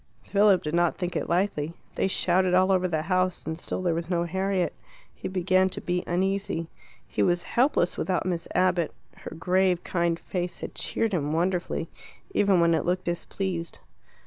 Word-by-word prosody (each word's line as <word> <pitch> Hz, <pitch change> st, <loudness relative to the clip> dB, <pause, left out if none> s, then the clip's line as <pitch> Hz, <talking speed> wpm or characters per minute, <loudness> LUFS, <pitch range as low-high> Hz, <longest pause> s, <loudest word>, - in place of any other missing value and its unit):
Philip 200 Hz, -2 st, +4 dB
did 150 Hz, -, -3 dB
not 175 Hz, -1 st, +2 dB
think 180 Hz, -1 st, -3 dB
it -, -, -2 dB
likely. 170 Hz, -3 st, 0 dB, 0.2 s
They -, -, +1 dB
shouted 185 Hz, -1 st, +2 dB
all 185 Hz, +1 st, +4 dB
over 185 Hz, -1 st, +3 dB
the 160 Hz, -3 st, -1 dB
house 185 Hz, +1 st, 0 dB
and 160 Hz, -, -2 dB
still 175 Hz, +2 st, -4 dB
there 175 Hz, -2 st, +2 dB
was 165 Hz, +1 st, -3 dB
no 170 Hz, -2 st, +1 dB
Harriet. 190 Hz, +1 st, 0 dB, 0.4 s
He -, -, -6 dB
began 185 Hz, 0 st, +2 dB
to -, -, -5 dB
be 180 Hz, 0 st, -1 dB
uneasy. 190 Hz, -2 st, -1 dB, 0.4 s
He -, -, -2 dB
was 175 Hz, -1 st, +2 dB
helpless 240 Hz, -, +1 dB
without 185 Hz, -2 st, 0 dB
Miss 175 Hz, -2 st, -2 dB
Abbott; 180 Hz, -2 st, +2 dB, 0.2 s
her -, -, -8 dB
grave, 185 Hz, +1 st, +2 dB
kind 170 Hz, -1 st, 0 dB
face 180 Hz, -1 st, -4 dB
had -, -, -5 dB
cheered 225 Hz, -2 st, -1 dB
him 150 Hz, -4 st, 0 dB
wonderfully, 175 Hz, +2 st, 0 dB, 0.4 s
even 200 Hz, -, +3 dB
when 170 Hz, 0 st, +4 dB
it -, -, +1 dB
looked 180 Hz, +1 st, -1 dB
displeased. 175 Hz, 0 st, -3 dB
180 Hz, 175 wpm, -26 LUFS, 170-190 Hz, 0.4 s, Philip